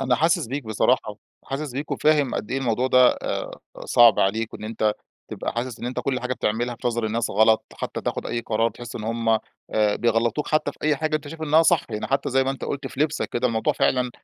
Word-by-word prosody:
أنا 130 -2 +2
حاسس 160 0 +2
بيك 135 +3 -4
بصراحة، 110 0 +1 0.3
حاسس 140 0 -4
بيك 140 +4 -5
وفاهم 150 -4 +2
قد - - -4
إيه 135 - 0
الموضوع 125 -1 0
ده 130 -1 +6
آآ، - - -3 0.3
صعب 120 -3 +6
عليك، 110 +3 0
وإن - - -8
أنتَ 110 -1 0 0.4
تبقى - - -4
حاسس 120 0 -4
إن - - -4
أنتَ 125 - -3
كل 130 -2 -1
حاجة 125 0 -2
بتعملها 120 +2 -1
في - - -3
نظَر 120 -1 -1
الناس 115 +1 -1
غلَط، 110 +2 +4
حتى - - -5
تاخُد - - -3
أي 120 - -2
قرار 115 0 0
تحس 120 +2 -9
إن 110 - -6
هُم 115 0 -2
آآ، 110 -1 0
بيغلِّطوك، 120 +4 +1
حتى 155 -1 +1
في - - -24
أي 150 -1 +2
حاجة 155 +2 0
أنتَ 150 -1 -8
شايِف 160 +1 -8
إنها 155 +1 +4
صح، 165 -1 +3
يعني 105 -1 -3
حتى 135 - 0
زي 135 +1 +3
ما 135 - 0
أنتَ 135 - -5
قُلت 140 -1 -4
في 135 - -8
لِبسَك. 150 0 0
كده 120 +1 +1
الموضوع 110 -2 0
فعلًا 125 -1 +1
125 Hz, 230 wpm, -24 LUFS, 115-140 Hz, 0.4 s, ده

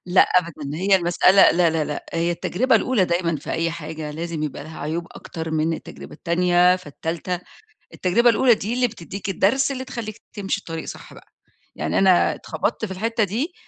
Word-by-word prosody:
لأ 180 +1 +6
أبدًا، 155 -5 -1
هي 195 +3 +4
المسألة 185 +2 +5
لا 170 -1 +3
لا 160 -1 0
لأ 150 - -5
هي 170 +1 0
التجربة 225 +8 +1
الأولى 225 -2 +2
دايمًا 170 -2 0
في 145 - -8
أي 165 +1 0
حاجة 160 -2 -6
لازم 165 +1 -4
يبقى 150 -1 -4
لها 160 0 -10
عيوب 165 +3 -3
أكتر 160 -1 -7
من 160 +1 0
التجربة 70 - -10
التانية 180 - +3
فالتالتة، 170 +2 -4 0.5
التجربة 235 +7 +3
الأولى 240 +1 +5
دي 215 +3 -4
اللي 250 0 +2
بتدّيك 200 -1 -7
الدرس 230 +9 +2
اللي 260 -1 -4
تخلّيك 230 -4 -7
تمشي 195 -2 -2
الطريق 165 -4 -6
صح - - -9
بقى، - - -16 0.5
يعني - - -1
أنا 190 -2 +4
اتخبطت - - -3
في 195 - -8
الحتة 225 +4 -1
دي 240 - -2
180 Hz, 180 wpm, -22 LUFS, 165-205 Hz, 0.5 s, لأ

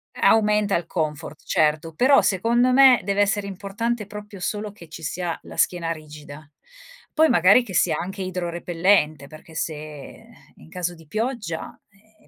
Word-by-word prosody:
Aumenta 210 -2 +3
il 170 - -2
comfort, 155 -2 -4
certo. 155 +1 +1
Però, 265 - +5
secondo 235 +6 +2
me, 265 -2 +7
deve 200 0 +1
essere 205 0 0
importante 205 +4 -3
proprio 205 -1 -10
solo 210 +2 -3
che 170 -6 -15
ci 165 +1 -10
sia 170 +3 -3
la - - -11
schiena 170 -2 0
rigida. 150 -2 -10 0.6
Poi 315 0 +4
magari 185 +8 +5
che 200 -6 -9
sia 165 -3 +2
anche 190 +2 -5
idrorepellente 175 -4 0
perché 155 +2 -14
se 155 - -2 0.8
in 80 - -17
caso 175 -1 -4
di 165 -2 -18
pioggia, 215 - -4
eh 215 +2 -29
185 Hz, 150 wpm, -23 LUFS, 165-210 Hz, 0.8 s, me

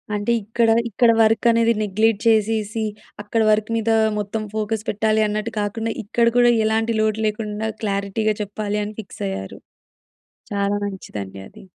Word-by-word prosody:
అంటే 205 +3 -1
ఇక్కడ 225 +3 +1 0.2
ఇక్కడ 230 +2 +4
వర్క్ 220 0 +3
అనేది 230 0 +3
నెగ్‌లెట్ 215 +1 +1
చేసేసి, 220 0 +1 0.4
అక్కడ 210 +2 -1
వర్క్ 215 +1 +1
మీద 225 0 -1 0.3
మొత్తం 210 +2 -3
ఫోకస్ 215 0 -2
పెట్టాలి 215 +1 +1
అన్నట్టు 215 +2 -3
కాకుండా, 225 +2 -2
ఇక్కడ 235 +3 +1
కూడా 240 0 +6
ఎలాంటి 225 +1 +1
లోటు 215 0 0
లేకుండా 215 0 -3
క్లారిటీగా 200 +1 0
చెప్పాలి 210 0 -3
అని 210 +1 -6
ఫిక్స్ 195 - -9
అయ్యారు. 95 0 -6 1.0
చాలా 200 0 0
మంచిదండి 105 - -7
అది. - - -15
215 Hz, 145 wpm, -21 LUFS, 205-225 Hz, 1.0 s, కూడా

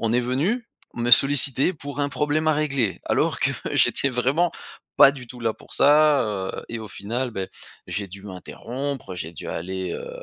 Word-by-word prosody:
On 115 0 -1
est 125 - +2
venu, 150 - -1 0.3
me 120 0 -2
solliciter 135 +4 +7
pour 145 -2 -8
un 145 - 0
problème 150 +2 -1
à - - +4
régler. 135 - -1
Alors - - 0
que, - - +2 0.2
j'étais 140 - +3
vraiment 135 +8 0 0.4
pas 135 - +8
du 125 -3 -10
tout 125 +1 -12
là 115 -1 -1
pour - - -8
ça, 150 -1 +4
heu 100 -4 -5
et 115 - -5
au 110 - -8
final, 115 +6 -4
beh, 95 -3 -5 0.4
j'ai 100 -1 -4
dû 100 +1 -12
m'interrompre. 120 +5 -7
J'ai 85 -2 -6
dû 80 - -9
aller, 95 +1 -5
heu, - - -7
125 Hz, 190 wpm, -23 LUFS, 105-145 Hz, 0.4 s, pas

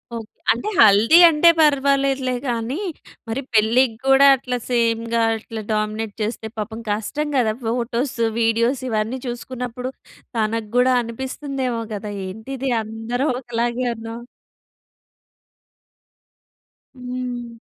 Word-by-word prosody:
Okay. 225 -2 -7 0.2
అంటే, 240 - -2
హల్దీ 220 +7 +7
అంటే 325 +1 +5
పర్వాలేదులే 275 -3 +2 0.2
గానీ, 235 +4 -2 0.5
మరి 235 +5 -2
పెళ్ళికి 225 +2 +3
గూడా 270 +1 +6
అట్లా 250 -1 -3
సేమ్‌గా 230 -1 +1 0.2
అట్లా 220 0 -7
డామినేట్ 215 0 -2
చేస్తే 220 +1 -3
పాపం 220 +1 -5
కష్టం 220 +9 -2
గదా. 225 -4 +2
ఫోటోస్, 235 +3 -1 0.2
వీడియోస్ 230 +3 +1
ఇవన్నీ 220 +3 -1
చూసుకున్నప్పుడు 250 +1 -5 0.5
తనకి 220 0 -1
గూడా 255 +1 +4
అనిపిస్తుందేమో 260 +1 -4
కదా! 210 0 -5 0.2
ఏంటిది 260 +7 -5
అందరూ 225 +5 -3
ఒకలాగే 240 0 -2
ఉన్నాం. 225 +1 -8 2.7
హ్మ్. 250 -2 -6
235 Hz, 100 wpm, -21 LUFS, 225-260 Hz, 2.7 s, హల్దీ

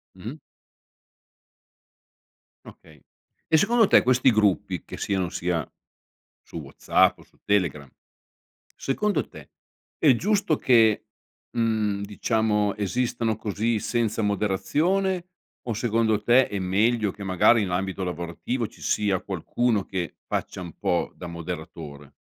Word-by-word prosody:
Mh-mh. 115 +11 -8 2.3
Okay. 75 -3 -16 0.5
E 160 - +4
secondo 225 +4 +4
te - - +6
questi 130 0 +4
gruppi 100 -4 +1
che - - -9
siano 95 -3 -1
sia 85 -3 -2 0.7
su - - -10
WhatsApp 70 -3 +2
o - - -15
su - - -29
Telegram 80 -9 0 0.9
secondo 205 +10 -1
te - - -13 0.5
è 140 -5 +5
giusto 200 - +1
che, 115 -4 +4 0.5
mhmm, 110 -3 0
diciamo, 105 0 0
esistano 115 +2 -1
così 110 +2 -1
senza 115 0 -1
moderazione, 155 - 0 0.4
o 120 - -1
secondo 110 -1 +1
te 125 +2 +4
è 100 - -3
meglio 105 +4 +1
che, 100 +1 -9
magari 95 +4 +4
in 95 - -2
ambito 95 +1 -2
lavorativo, 90 +8 -3
ci - - -18
sia 100 -3 0
qualcuno 105 +3 -1
che 90 -3 -4
faccia - - -3
un 85 -3 -8
po' - - 0
da 90 - -8
moderatore? 80 -4 -8
105 Hz, 120 wpm, -25 LUFS, 95-120 Hz, 2.3 s, te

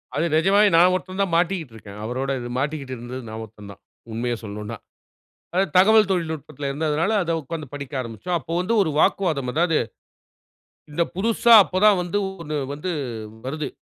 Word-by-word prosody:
அது 155 - +1
நிஜமாவே 200 +5 +5
நான் 180 +2 +6
ஒருத்தன் 185 +1 -3
தான் 175 -4 -3
மாட்டிட்டுருக்கேன். 130 - -3
அவரோட 130 +4 -3
இது 120 0 -6
மாட்டிக்கிட்டு 140 -2 -3
இருந்தது 125 +2 -7
நான் 110 +1 -6
ஒருத்தன் 105 -2 -12
தான். 100 - -15 0.3
உண்மைய 120 +1 -2
சொல்லனுனா. 105 0 -6 0.8
அதாவது 190 +2 +1
தகவல் 215 +1 +6
தொழில்நுட்பத்துல 155 -5 -3
இருந்ததனால 155 +6 0
அத 165 -1 -1
உட்காந்து 155 +2 -6
படிக்க 140 0 -7
ஆரம்பிச்சோம். 115 - -4
அப்போ - - -8
வந்து 225 +6 0
ஒரு 160 - -1
வாக்குவாதம் 155 -9 +1
அதாவது, 165 +1 +2 1.1
இந்த 170 +3 +1
புதுசா 230 +4 +3
அப்ப 185 0 -2
தான் 205 -3 +6
வந்து 175 +3 -2 0.2
1 150 -2 -3 0.2
வந்து 150 +5 -4 0.5
வருது. 150 +1 -3
155 Hz, 155 wpm, -23 LUFS, 130-180 Hz, 1.1 s, நான்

